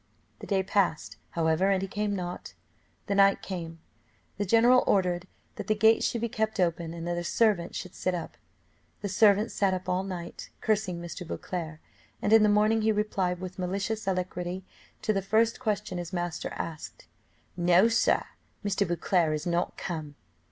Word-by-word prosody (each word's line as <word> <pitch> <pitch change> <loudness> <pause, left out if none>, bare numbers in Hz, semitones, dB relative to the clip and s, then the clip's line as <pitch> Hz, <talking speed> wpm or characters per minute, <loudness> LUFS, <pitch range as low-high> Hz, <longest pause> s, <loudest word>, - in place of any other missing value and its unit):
The - - -9
day 195 -2 +1
passed, 190 -5 0 0.2
however, 165 +3 +2
and 195 -1 +3
he 195 - -3
came 205 +1 -2
not 180 -1 -6 0.5
the - - -1
night 195 0 +4
came. 165 -3 -6 0.6
The 205 - -1
general 240 +4 +5
ordered 180 -2 +1 0.3
that 210 -3 -6
the 215 - +2
gate 220 +2 +4
should 235 - 0
be 235 - 0
kept 220 -1 -2
open, 170 -2 0
and 170 0 -6
that 175 0 -1
a - - -4
servant 200 -3 +1
should 180 - -6
sit 185 - -1
up. 170 -2 -6 0.7
The 205 - -3
servant 210 +2 +4
sat 195 -2 +1
up 185 - -6
all 180 +1 +1
night, 180 -3 -7
cursing 205 -5 0
Mr. 170 +1 -7
Beauclerc. 165 -3 -5 0.4
And 210 - +1
in 225 - +8
the 210 - +5
morning 215 +2 +3
he 220 0 +3
replied 195 -4 0
with 185 0 -7
malicious 200 +4 -2
alacrity 180 0 -2 0.4
to 215 - +2
the 195 - 0
first 220 +4 +2
question 210 -6 -2
his 175 0 -6
master 175 -2 -3
asked, 160 -2 -7 0.5
"No, 175 +4 +5
Sir, 230 0 +2 0.4
Mr. 200 -1 +1
Beauclerc 170 -2 +1
is 150 - -5
not 175 0 -1
come." 155 -5 -5
190 Hz, 175 wpm, -28 LUFS, 175-210 Hz, 0.7 s, in